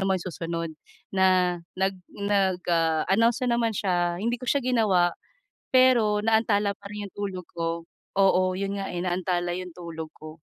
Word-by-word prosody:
ng -, -, 0 dB
mga 190 Hz, -2 st, 0 dB
susunod 165 Hz, 0 st, -4 dB, 0.4 s
na, 185 Hz, -2 st, +3 dB, 0.2 s
nag 190 Hz, +1 st, +1 dB, 0.2 s
nag, 200 Hz, -3 st, 0 dB
ah, 165 Hz, -2 st, +2 dB
announce 230 Hz, +4 st, +3 dB
na 235 Hz, -1 st, +2 dB
naman 230 Hz, -1 st, +1 dB
siya 175 Hz, -3 st, 0 dB
hindi 235 Hz, +3 st, 0 dB
ko 255 Hz, -, -7 dB
siya 280 Hz, -2 st, +2 dB
ginawa, 200 Hz, -8 st, +3 dB, 0.6 s
pero 245 Hz, -5 st, +5 dB
naantala 215 Hz, -2 st, +2 dB
pa 200 Hz, -, -12 dB
rin 210 Hz, -1 st, -5 dB
'yung -, -, -15 dB
tulog 190 Hz, -3 st, -4 dB
ko 165 Hz, 0 st, -2 dB, 0.3 s
oo 190 Hz, -1 st, +5 dB
'yun 200 Hz, +1 st, -2 dB
nga 195 Hz, -, -4 dB
eh, 175 Hz, -, -4 dB
naantala 175 Hz, -1 st, -1 dB
'yung 180 Hz, 0 st, -5 dB
tulog 165 Hz, -2 st, -7 dB
ko. 155 Hz, +1 st, -11 dB
190 Hz, 170 wpm, -26 LUFS, 175-210 Hz, 0.6 s, pero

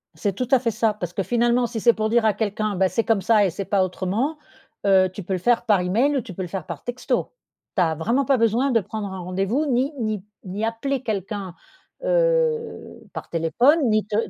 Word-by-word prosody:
C'est 195 Hz, +5 st, -1 dB
tout 250 Hz, +6 st, -3 dB
à 265 Hz, -, +6 dB
fait 235 Hz, -2 st, 0 dB
ça, 220 Hz, 0 st, +1 dB
parce 175 Hz, -4 st, -6 dB
que, 195 Hz, -, -1 dB
finalement, 240 Hz, +2 st, +2 dB
si 230 Hz, -1 st, -4 dB
c'est 235 Hz, +2 st, +5 dB
pour 215 Hz, 0 st, -1 dB
dire 235 Hz, 0 st, +3 dB
à 215 Hz, -, +4 dB
quelqu'un: 215 Hz, -1 st, -2 dB
«Bah, 190 Hz, 0 st, +2 dB
c'est 230 Hz, -, 0 dB
comme 220 Hz, -3 st, +1 dB
ça 215 Hz, 0 st, +4 dB
et -, -, +1 dB
c'est 195 Hz, +3 st, -5 dB
pas 195 Hz, -1 st, +2 dB
autrement», 195 Hz, -, -2 dB, 0.5 s
heu, 190 Hz, -1 st, +5 dB
tu 200 Hz, -, -7 dB
peux 190 Hz, -, -3 dB
le 185 Hz, -, -1 dB
faire 240 Hz, +6 st, +2 dB
par 205 Hz, -4 st, +3 dB
email 230 Hz, +11 st, +1 dB
ou -, -, 0 dB
tu 220 Hz, -5 st, -10 dB
peux 190 Hz, -, -6 dB
le -, -, -5 dB
faire 180 Hz, 0 st, -5 dB
par 170 Hz, -6 st, -7 dB
texto. 245 Hz, +1 st, -2 dB, 0.4 s
Tu 190 Hz, -, +2 dB
as 160 Hz, -2 st, +2 dB
vraiment 235 Hz, -, 0 dB
pas 275 Hz, 0 st, +3 dB
besoin 230 Hz, +4 st, +2 dB
de 230 Hz, -, +4 dB
prendre 205 Hz, 0 st, -5 dB
un 190 Hz, -, -6 dB
rendez-vous, 195 Hz, -, -1 dB
ni 265 Hz, +1 st, +1 dB
ni 215 Hz, -4 st, -2 dB, 0.2 s
ni 200 Hz, +3 st, -3 dB
appeler 260 Hz, +4 st, -2 dB
quelqu'un, 200 Hz, -3 st, -4 dB, 0.5 s
heu, -, -, 0 dB
par -, -, -7 dB
téléphone, 240 Hz, -, +3 dB
ni 215 Hz, -1 st, +2 dB
te 210 Hz, -, -3 dB
215 Hz, 230 wpm, -23 LUFS, 190-245 Hz, 0.5 s, à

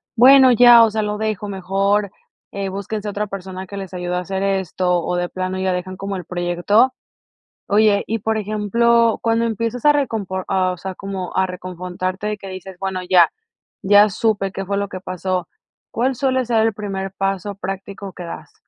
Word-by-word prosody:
"Bueno 260 Hz, +2 st, +8 dB
ya, 240 Hz, 0 st, +8 dB
o 225 Hz, -, +4 dB
sea, 215 Hz, 0 st, -1 dB
lo 210 Hz, 0 st, -2 dB
dejo 215 Hz, -2 st, -2 dB
mejor, 195 Hz, +1 st, 0 dB, 0.4 s
eh, 200 Hz, -1 st, -3 dB
búsquense 200 Hz, +2 st, -5 dB
otra 210 Hz, +1 st, -2 dB
persona 190 Hz, -1 st, -7 dB
que 200 Hz, -, -8 dB
les 190 Hz, -2 st, -7 dB
ayude 180 Hz, 0 st, -3 dB
a -, -, 0 dB
hacer 190 Hz, +2 st, -4 dB
esto", 185 Hz, -2 st, 0 dB
o 180 Hz, -, -2 dB
de 175 Hz, 0 st, -1 dB
plano, 185 Hz, 0 st, -3 dB
ya 190 Hz, -1 st, 0 dB
dejan 185 Hz, +1 st, -4 dB
como 195 Hz, +1 st, -5 dB
el 180 Hz, -3 st, -6 dB
proyecto. 175 Hz, +8 st, +2 dB, 0.8 s
Oye, 205 Hz, 0 st, +3 dB
y 225 Hz, +1 st, -1 dB
por 220 Hz, +1 st, -1 dB
ejemplo, 225 Hz, +2 st, +2 dB
cuando 230 Hz, 0 st, +1 dB
empiezas 230 Hz, +1 st, -2 dB
a 295 Hz, -, +7 dB
recompor 205 Hz, -9 st, -2 dB
ah, 185 Hz, -1 st, +1 dB
o 180 Hz, -, -6 dB
sea, 190 Hz, +2 st, -6 dB
como 195 Hz, -2 st, -6 dB
a 190 Hz, -, +3 dB
reconfortarte 185 Hz, +2 st, -5 dB
de 210 Hz, -1 st, -2 dB
que 195 Hz, -, -10 dB
dices: 185 Hz, 0 st, -9 dB
"Bueno, 190 Hz, -1 st, -3 dB
ya, 180 Hz, -1 st, +5 dB, 0.5 s
ya 205 Hz, +2 st, +6 dB
supe 200 Hz, -1 st, 0 dB
qué 195 Hz, -, -5 dB
fue 200 Hz, +1 st, -2 dB
lo 200 Hz, 0 st, -2 dB
que 185 Hz, -, -6 dB
pasó". 185 Hz, -1 st, -3 dB, 0.4 s
¿Cuál 255 Hz, +4 st, 0 dB
suele 260 Hz, 0 st, 0 dB
ser 225 Hz, -2 st, +2 dB
el -, -, +1 dB
primer 195 Hz, -2 st, -4 dB
paso 195 Hz, 0 st, -2 dB
práctico 195 Hz, 0 st, -6 dB
que -, -, -10 dB
das? 170 Hz, -, -9 dB
195 Hz, 195 wpm, -20 LUFS, 185-215 Hz, 0.8 s, Bueno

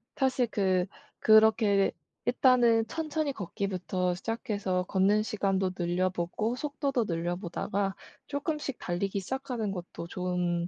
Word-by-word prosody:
사실 260 Hz, -3 st, +2 dB
그 185 Hz, -3 st, +2 dB, 0.3 s
그렇게 215 Hz, -2 st, +5 dB, 0.3 s
일단은 240 Hz, -3 st, +4 dB
천천히 310 Hz, -2 st, -2 dB
걷기부터 185 Hz, -3 st, -2 dB
시작해서 200 Hz, -3 st, -2 dB
걷는 195 Hz, +3 st, +3 dB
시간도 195 Hz, -3 st, 0 dB
늘려보고 180 Hz, +5 st, 0 dB
속도도 280 Hz, -4 st, -1 dB
늘려보다가 175 Hz, +3 st, -2 dB, 0.3 s
조금씩 290 Hz, -2 st, -3 dB
달리기 195 Hz, +3 st, -2 dB
시작하는 245 Hz, -1 st, -3 dB
것도 175 Hz, -2 st, -6 dB
좋은 180 Hz, -1 st, -1 dB
200 Hz, 285 characters per minute, -29 LUFS, 180-245 Hz, 0.3 s, 그렇게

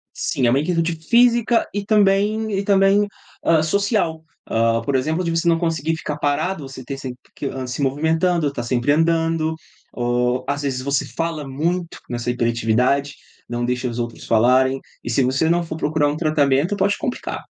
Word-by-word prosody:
Sim, 125 Hz, -, 0 dB
é -, -, +4 dB
uma 130 Hz, +3 st, +3 dB
inquietude 165 Hz, +1 st, 0 dB
física 235 Hz, +6 st, +3 dB
e 205 Hz, 0 st, -3 dB
também 210 Hz, +1 st, +2 dB
e -, -, -2 dB
também, 200 Hz, +1 st, +4 dB, 0.4 s
hã, 165 Hz, -2 st, +4 dB
social. 195 Hz, -3 st, 0 dB, 0.3 s
Hã, 115 Hz, 0 st, +2 dB
por 135 Hz, +4 st, -2 dB
exemplo, 155 Hz, +7 st, 0 dB
de 170 Hz, -, -1 dB
você 165 Hz, +1 st, 0 dB
não 165 Hz, -1 st, +3 dB
conseguir 165 Hz, -2 st, -1 dB
ficar 150 Hz, -2 st, -5 dB
parado, 145 Hz, +2 st, -1 dB
você 135 Hz, -1 st, -9 dB
ter 135 Hz, +2 st, -6 dB
sempre 130 Hz, -2 st, -7 dB, 0.2 s
que, -, -, -6 dB
hã, 130 Hz, -1 st, -4 dB
se 125 Hz, +3 st, -4 dB
movimentando, 160 Hz, +3 st, +1 dB
tá 120 Hz, -, -5 dB
sempre 120 Hz, +3 st, +1 dB
andando 165 Hz, 0 st, +1 dB, 0.4 s
ou 125 Hz, +1 st, 0 dB
às 145 Hz, +1 st, -1 dB
vezes 135 Hz, -3 st, -2 dB
você 140 Hz, +1 st, 0 dB
fala 165 Hz, -3 st, -3 dB
muito 170 Hz, +6 st, -2 dB
nessa 120 Hz, 0 st, -3 dB
hiperatividade, 120 Hz, +4 st, +1 dB, 0.3 s
não 120 Hz, 0 st, -2 dB
deixa 125 Hz, +1 st, -1 dB
os 120 Hz, -, -6 dB
outros 120 Hz, -1 st, -4 dB
falarem. 130 Hz, +4 st, +3 dB, 0.2 s
E -, -, -5 dB
se 125 Hz, +3 st, +2 dB
você 130 Hz, +5 st, +1 dB
não 170 Hz, +1 st, +2 dB
for 160 Hz, -1 st, -6 dB
procurar 150 Hz, -1 st, +1 dB
um 145 Hz, -, -2 dB
tratamento, 155 Hz, +2 st, +2 dB
pode 200 Hz, +1 st, +2 dB
complicar. 260 Hz, -5 st, -4 dB
150 Hz, 180 wpm, -21 LUFS, 130-170 Hz, 0.4 s, é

